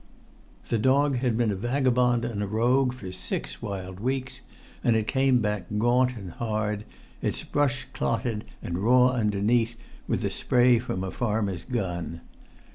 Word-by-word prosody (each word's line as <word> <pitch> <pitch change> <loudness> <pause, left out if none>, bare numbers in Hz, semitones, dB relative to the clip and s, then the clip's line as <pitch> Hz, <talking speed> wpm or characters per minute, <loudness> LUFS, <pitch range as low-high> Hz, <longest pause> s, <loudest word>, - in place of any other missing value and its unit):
The 115 - +1
dog 135 +3 +3
had 120 -3 0
been 115 -3 +2
a - - -1
vagabond 125 +1 +2
and 115 -4 -3
a 100 - -1
rogue 125 +5 +2
for 110 -7 -8
six - - -4
wild 95 -3 -5
weeks, 130 +3 -2 0.4
and 115 - +3
it 110 -1 +1
came 130 0 +3
back 105 -4 -1
gaunt 125 +2 +3
and 95 -4 -7
hard, 105 0 -2 0.4
its - - -1
brush 135 -3 0
clotted 115 -2 -1 0.2
and 85 +1 -3
raw 125 +4 +5
underneath 115 0 +1 0.3
with - - 0
the - - -1
spray 125 -1 +4
from 95 -6 -3
a 95 - -3
farmer's 105 -6 -1
gun. 90 -8 -3
115 Hz, 155 wpm, -26 LUFS, 105-125 Hz, 0.4 s, raw